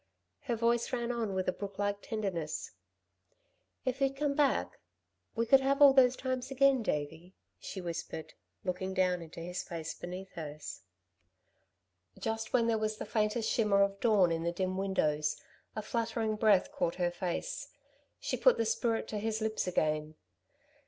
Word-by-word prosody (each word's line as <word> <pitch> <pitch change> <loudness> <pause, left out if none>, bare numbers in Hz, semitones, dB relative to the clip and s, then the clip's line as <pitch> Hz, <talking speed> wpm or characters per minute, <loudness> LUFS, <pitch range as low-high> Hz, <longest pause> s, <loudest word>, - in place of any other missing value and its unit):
Her 240 -4 0
voice 235 +1 +1
ran 240 -1 -1
on 225 -5 -2
with 185 -1 -1
a 185 - +2
brooklike 205 0 -3
tenderness. 190 -9 -3 1.1
"If 260 +1 -1
you'd 270 0 +2
come 290 0 0
back, 280 -2 +1 0.6
we 230 0 +1
could 270 +4 +7
have 275 +1 +1
all 285 -2 +9
those 260 -2 +6
times 255 -1 -3
again, 270 -1 +4
Davey," 160 0 -3 0.2
she 190 - -6
whispered, 165 -2 -5 0.3
looking 185 +1 -2
down 180 -2 +2
into 165 0 -9
his 180 +2 -4
face 165 -1 -5
beneath 185 +2 -7
hers. 150 - -7 1.4
Just 225 0 -3
when 240 -2 +3
there 225 -1 +2
was 215 0 -1
the - - -5
faintest 215 +1 0
shimmer 205 -3 +4
of 200 0 -1
dawn 205 -7 +4
in 165 0 0
the 170 +1 0
dim 185 +1 -2
windows, 155 -6 0 0.4
a 215 - -3
fluttering 225 -1 -1
breath 215 +4 +4
caught 275 - -1
her 175 -1 0
face. 185 - -3 0.5
She - - -2
put - - +5
the 230 - +1
spirit 225 +1 0
to 210 - -2
his 220 +1 -1
lips 220 -3 -1
again. 155 -3 0
210 Hz, 160 wpm, -32 LUFS, 180-235 Hz, 1.4 s, all